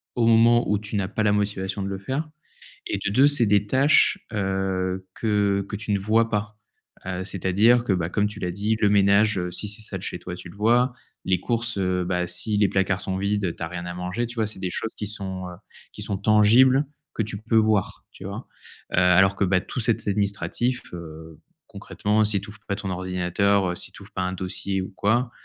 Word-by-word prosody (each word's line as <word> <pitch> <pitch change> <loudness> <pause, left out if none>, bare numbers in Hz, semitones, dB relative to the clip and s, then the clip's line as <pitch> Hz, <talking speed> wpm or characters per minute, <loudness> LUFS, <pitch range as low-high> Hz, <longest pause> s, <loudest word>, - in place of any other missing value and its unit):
au 115 -2 +2
moment 115 +1 +5
où 105 - +2
tu 105 +1 -5
n'as 95 -2 -1
pas 110 +2 -2
la 105 - +3
motivation 100 -1 -1
de 95 - -3
le 100 - -4
faire 135 +11 -4 0.6
et - - -1
de 100 - +1
2, 135 +6 +5
c'est 145 -5 +3
des 105 0 +2
tâches, 135 +6 +4 0.2
heu, 95 -2 -1
que 100 -3 0
que - - -5
tu 105 +1 -5
ne 100 - +2
vois 110 +3 +2
pas, 105 -1 -3 0.5
heu, 95 0 -3
c'est 95 -1 -6
à 95 - +2
dire 120 +5 +5
que, 120 - -1
bah, 85 -2 -1
comme 105 +2 +1
tu 105 0 -9
l'as 90 -2 -2
dit, 105 +4 -1
le 105 - +4
ménage, 100 +1 +4
heu, 90 0 -3
si 105 +4 -2
c'est 105 +2 -4
sale 95 -4 -5
chez 90 - -5
toi, 90 - -7
tu 90 - -10
le 90 - -14
vois, 120 +4 +2 0.3
les 95 -1 +2
courses, 115 -1 0
heu, 90 -2 0
bah, 90 0 -1
si 105 +4 +1
les 100 -1 +4
placards 95 0 0
sont 95 0 -3
vides, 100 +1 -1
heu, 85 - -1
tu - - -16
as 80 - -2
rien 85 0 -6
à 90 - -5
manger, 90 +7 -3
tu 120 - -9
vois? 110 -2 0
C'est 105 - -5
des 95 - -2
choses 110 +5 -4
qui 105 - -4
sont, 95 -3 -1
heu, 90 - -9 0.4
qui - - -6
sont 100 -1 -1
tangibles, 115 +7 +5 0.3
que 110 - -1
tu 105 -1 -5
peux 115 +2 0
voir, 110 -3 +1
tu - - -13
vois? - - -7 0.5
Heu, - - -1
alors 95 +2 +5
que, 100 - 0
bah, 95 0 +2
tout - - -6
cet 110 -2 0
administratif, 105 +5 -1
heu, 80 -2 -10 0.3
concrètement, 105 +1 -1
si 105 -1 +1
tu 100 - -10
ouvres 105 - -13
pas 100 - -1
ton 100 -2 -5
ordinateur, 95 +1 0
heu, - - -4
si - - -5
tu - - -13
ouvres - - -17
pas 90 - -2
un 90 0 -2
dossier 95 +1 -3
ou 95 - -6
quoi, 120 +5 +1
100 Hz, 240 wpm, -24 LUFS, 95-110 Hz, 0.6 s, moment